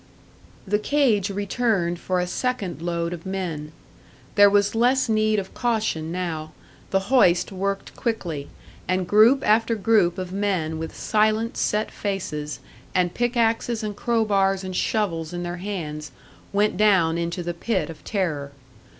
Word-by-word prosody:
The 210 +1 +1
cage 220 -6 +2
returned 200 -3 0
for 185 0 -1
a 180 - 0
second 195 -4 -2
load 170 0 -2
of 170 -2 -8
men. 175 -6 -4 0.6
There 205 -1 +7
was 205 0 +3
less 250 +4 +3
need 215 -1 +2
of 190 -2 -4
caution 220 -10 -1
now; 160 -3 -4 0.4
the 195 - +2
hoist 180 -9 +4
worked 195 +1 -3
quickly, 170 - -3 0.4
and 185 0 0
group 225 +7 +5
after 225 +2 +3
group 205 -5 +3
of 185 -1 -5
men 185 -6 -1
with 160 0 -6
silent, 215 +1 +1
set 215 +1 0
faces, 150 -8 -4 0.4
and 180 -1 +2
pickaxes 235 -1 0
and 210 -1 -3
crow 230 +1 +1
bars 195 -2 +2
and 185 -1 -5
shovels 175 -6 -1
in 175 0 -3
their 175 0 -4
hands, 155 -6 -5 0.4
went 205 -1 +1
down 185 -6 +3
into 170 +1 -3
the 175 0 -3
pit 185 0 -1
of 160 - -13
terror. 155 -9 -2
195 Hz, 150 wpm, -24 LUFS, 170-215 Hz, 0.6 s, There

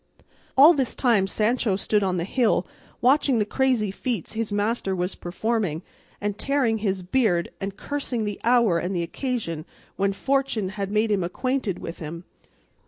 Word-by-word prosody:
All 295 +6 +9
this 270 -6 -1
time 225 -7 +3
Sancho 215 0 +1
stood 205 +2 +1
on 185 -2 0
the 170 - -1
hill 215 -1 +1 0.4
watching 265 0 +4
the 210 - +2
crazy 245 -3 +1
feats 220 -2 -3
his 225 -1 -2
master 205 -1 0
was 180 +1 -1
performing, 190 -3 -2 0.4
and 205 0 -3
tearing 260 -6 +1
his 195 -3 -1
beard 180 -4 +1
and 195 0 -4
cursing 265 -5 -3
the 205 -1 -4
hour 235 -7 +4
and 180 +3 -2
the 170 - 0
occasion 170 - -3 0.3
when 195 0 +2
fortune 265 -3 0
had 195 0 -4
made 215 +1 +1
him 195 -3 +2
acquainted 255 +2 -1
with 165 - -7
him. 170 +2 -6
210 Hz, 165 wpm, -25 LUFS, 190-245 Hz, 0.4 s, All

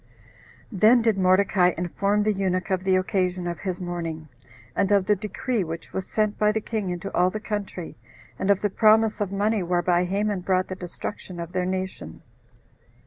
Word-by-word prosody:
Then 225 +4 +5
did 225 -2 +3
Mordecai 185 -1 +3
inform 200 +4 0
the 215 0 +2
eunuch 190 0 -1
of 185 -1 0
the 190 -1 +3
occasion 185 -1 0
of 170 -1 -4
his 185 -3 -4
mourning, 165 -3 -5 0.5
and 195 - +1
of 200 -2 +4
the 210 - +3
decree 210 +3 -2
which 165 0 -7
was 190 -1 -3
sent 215 -1 0
by 210 0 +4
the 220 - -1
king 215 -3 -3
into 180 +2 -5
all 180 +1 +3
the 215 - -4
country, 205 -5 -5 0.4
and 190 - -1
of 200 -1 +4
the 205 - 0
promise 220 +1 +4
of 200 -2 -1
money 205 +1 +1
whereby 175 0 +1
Haman 200 +2 -1
brought 185 0 0
the 185 - -4
destruction 180 0 -7
of 170 0 -6
their 180 0 -1
nation. 185 - -5
190 Hz, 185 wpm, -25 LUFS, 180-210 Hz, 0.5 s, Then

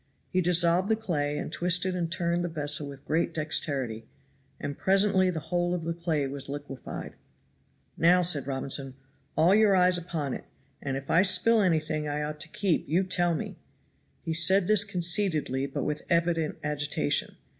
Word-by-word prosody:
He 185 - +1
dissolved 175 +2 +2
the 220 - +3
clay, 150 -9 -2
and - - -5
twisted 180 +2 +1
and 170 -2 -3
turned 170 0 -1
the 175 - -2
vessel 150 -2 +1
with 140 0 -12
great 160 +2 -1
dexterity, 135 -7 -1 0.5
and 140 - -5
presently 195 0 +2
the 170 -3 -3
whole 175 0 0
of 170 - -5
the 165 +1 -2
clay 165 -4 -2
was 135 0 -4
liquefied. 145 -1 -7 0.8
"Now," 180 +2 +4
said 150 -6 +1
Robinson, 135 0 -1 0.4
"all 165 +4 +4
your 210 -2 +4
eyes 180 -1 +3
upon 160 -6 -4
it, - - -7 0.4
and 135 -1 -3
if 135 0 -6
I 170 - +5
spill 220 +4 +4
anything 155 -4 0
I 150 0 -2
ought 150 0 -5
to 150 - 0
keep 180 -5 -1
you 175 +5 +2
tell 175 -2 +1
me." - - -6 0.7
He 165 - -3
said 185 +3 +4
this 210 +1 +4
conceitedly 175 -8 +1
but 135 - -4
with 150 0 -2
evident 170 -2 0
agitation. 145 - 0
165 Hz, 170 wpm, -27 LUFS, 145-180 Hz, 0.8 s, I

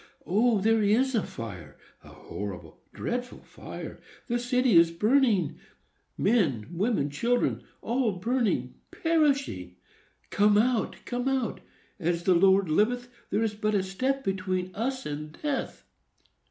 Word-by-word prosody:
"O! 220 +3 +3
there 225 +2 +3
is 235 +6 +3
a 225 - +2
fire!—a 90 - -10
horrible, 100 -3 -8
dreadful 245 +1 -4
fire! - - -9 0.2
The 240 -1 -1
city 250 -2 +2
is 165 0 +7
burning,—men, 200 - 0
women, 175 -5 0
children, 240 +12 0 0.2
all 235 -2 +1
burning, 230 +4 0 0.2
perishing! 280 - 0 0.6
Come 205 0 +4
out, 235 +1 +1
come 245 +1 -2
out! 265 -5 -1 0.4
As 170 -1 -1
the 185 - +4
Lord 190 +2 +4
liveth, 245 +9 +1 0.2
there 210 +3 +1
is 220 -2 0
but 215 0 -1
a 195 - +2
step 260 +9 -1
between 185 -2 -2
us 260 +6 -3
and 150 +1 -6
death!" 290 -3 -3
210 Hz, 125 wpm, -27 LUFS, 180-245 Hz, 0.6 s, is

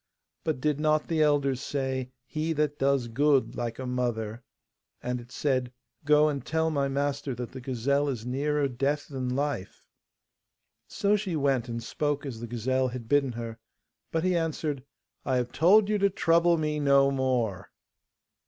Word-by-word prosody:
But 155 -5 -1
did 150 +1 0
not 155 0 +2
the 160 -2 +1
elders 140 -3 +2
say, 130 -3 -2 0.2
"He 155 +4 -2
that 150 -1 -1
does 135 -3 +2
good 140 +3 +2
like 120 -1 -3
a 130 - -5
mother!"' 120 -3 -2 0.6
And 125 0 -2
it 120 +1 -15
said, 130 -4 0 0.3
'Go 150 +1 +5
and 140 -2 -2
tell 160 0 0
my 140 -2 +1
master 140 -1 -1
that 120 0 -6
the 130 - -8
gazelle 135 +3 0
is 120 -4 -4
nearer 145 +3 0
death 140 +3 -1
than 130 -3 -3
life.' 140 -8 -3 1.0
So 205 +1 +1
she 195 -4 -2
went, 135 -5 +1
and 115 0 -4
spoke 145 -1 -2
as 125 -5 -5
the 120 - -6
gazelle 130 +3 0
had 125 -2 -6
bidden 140 -1 +2
her; 115 -1 -6 0.5
but 165 0 0
he 185 -1 +2
answered, 155 -4 -1 0.4
'I 130 - 0
have 125 -1 0
told 195 +9 +5
you 210 0 +1
to 200 0 +4
trouble 170 -1 +3
me 150 -1 -1
no 140 -1 +4
more. 125 -8 -1
140 Hz, 170 wpm, -28 LUFS, 125-150 Hz, 1.0 s, Go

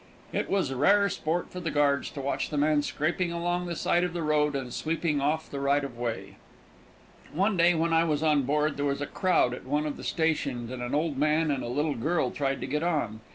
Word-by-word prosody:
It - - -1
was 190 -9 0
rare 200 +10 +4
sport 170 0 -2
for 180 - -6
the 170 -2 -3
guards 145 -1 +1
to 140 - -7
watch 140 +1 -2
the 150 - -3
man 150 0 +3
scraping 170 +5 -1
along 175 +1 -1
the 170 - -3
side 175 +2 +1
of 180 -2 -2
the 170 -2 -3
road 150 -1 +2
and 130 -3 -4
sweeping 160 -2 -1
off 155 +3 0
the 140 - -6
right 140 +1 +2
of 135 -3 -6
way. 120 -1 -4 0.9
One 195 +6 +1
day, 175 0 +4
when 165 +1 +1
I 165 0 +4
was 155 -2 0
on 150 -2 +3
board, 150 +2 0
there 145 - -1
was 140 0 -1
a - - -1
crowd 180 -8 +1
at - - -7
one 145 +3 0
of 150 - -3
the - - -9
stations, 140 -7 -1
and 130 -1 -5
an 120 +3 -2
old 150 -2 -1
man 155 +1 +2
and 140 - -1
a - - -4
little 145 +5 0
girl 140 +2 0
tried 135 -1 -2
to - - -2
get 150 +2 -1
on. 150 -11 -1
150 Hz, 240 wpm, -28 LUFS, 140-165 Hz, 0.9 s, rare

